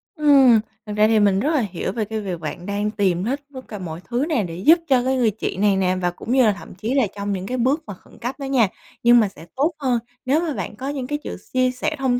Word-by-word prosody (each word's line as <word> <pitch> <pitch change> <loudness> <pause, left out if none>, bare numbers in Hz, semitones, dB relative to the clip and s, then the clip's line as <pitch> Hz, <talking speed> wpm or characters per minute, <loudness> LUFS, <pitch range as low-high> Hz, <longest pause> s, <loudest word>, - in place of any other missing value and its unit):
Ừm, 275 -7 +6 0.3
thực 210 0 -5
ra 215 +1 +5
thì 220 -1 +3
mình 200 -2 +3
rất 285 +8 0
là 295 - +3
hiểu 175 - -3
về 215 +1 -2
cái 220 +1 -4
việc 185 -4 -4
bạn 160 +2 -6
đang 205 +1 -1
tìm 190 -4 0
hết 270 +6 -2
tất 260 - -7
cả 210 - -7
mọi 165 -2 -6
thứ 245 +4 0
nè 255 -10 +1
để 165 -3 -6
giúp 320 - +5
cho 255 -3 +3
cái 260 +1 +1
người 240 -4 +2
chị 205 -2 -4
này 205 0 +3
nè, 185 -1 +1
và 175 -1 +1
cũng 200 - -7
như 260 0 +5
là 215 - +5
thậm 160 - -11
chí 220 +7 -3
là 265 -6 +3
trong 205 0 -3
những 190 0 -4
cái 255 +4 -3
bước 275 +6 +1
mà - - -5
khẩn 180 - -18
cấp 245 +3 -3
đó 275 - -4
nha. 260 -5 +3 0.4
Nhưng 240 0 +7
mà 215 - +3
sẽ 165 -3 -14
tốt 290 +6 +2
hơn 255 -4 +1 0.3
nếu 285 +5 +2
mà 330 -3 -2
bạn 210 - -5
có 265 +5 -5
những 270 -3 -4
cái 295 - -1
sự - - -5 0.2
chia 255 0 +3
sẻ 255 +5 -2
thông 250 -2 +1
230 Hz, 290 wpm, -22 LUFS, 200-265 Hz, 0.4 s, Nhưng